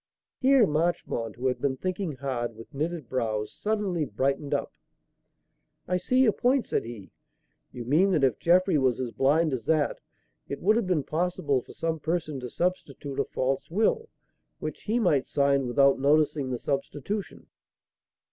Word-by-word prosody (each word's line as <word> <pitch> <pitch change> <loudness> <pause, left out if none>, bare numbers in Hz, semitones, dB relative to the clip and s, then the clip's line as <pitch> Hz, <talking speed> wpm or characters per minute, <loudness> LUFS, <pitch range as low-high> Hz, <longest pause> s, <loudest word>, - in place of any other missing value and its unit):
Here 265 -3 +5
Marchmont, 155 - -1
who 125 +3 -6
had 130 -1 0
been 135 -2 0
thinking 185 0 -3
hard, 125 -3 -3
with 115 +1 -13
knitted 155 0 -3
brows, 110 -4 -2
suddenly 205 -6 -1
brightened 135 +4 -1
up. - - -1 1.1
"I 180 - +1
see 255 +8 +2
your 225 - +5
point," 250 +5 +1
said - - -1
he. 115 -5 -9 0.6
"You 120 -2 -7
mean 160 +10 +3
that 155 -5 +2
if 130 -6 +2
Jeffrey 180 -1 +3
was 130 -3 +1
as 125 -2 -3
blind 150 +4 +2
as 120 -4 -4
that, 155 -3 +1 0.5
it 140 - -4
would 210 +4 +3
have 230 -4 0
been 170 -6 +1
possible 155 -5 0
for - - -14
some 165 -1 -2
person 155 -2 -2
to 125 -1 -6
substitute 145 -4 -3
a 140 - +2
false 135 0 -2
will, 220 - +1 0.5
which - - -6
he 220 +3 +1
might 165 - +2
sign 140 -2 +2
without 140 +3 +4
noticing 145 -1 +2
the 125 - -2
substitution." 145 - -4
145 Hz, 165 wpm, -27 LUFS, 130-180 Hz, 1.1 s, Here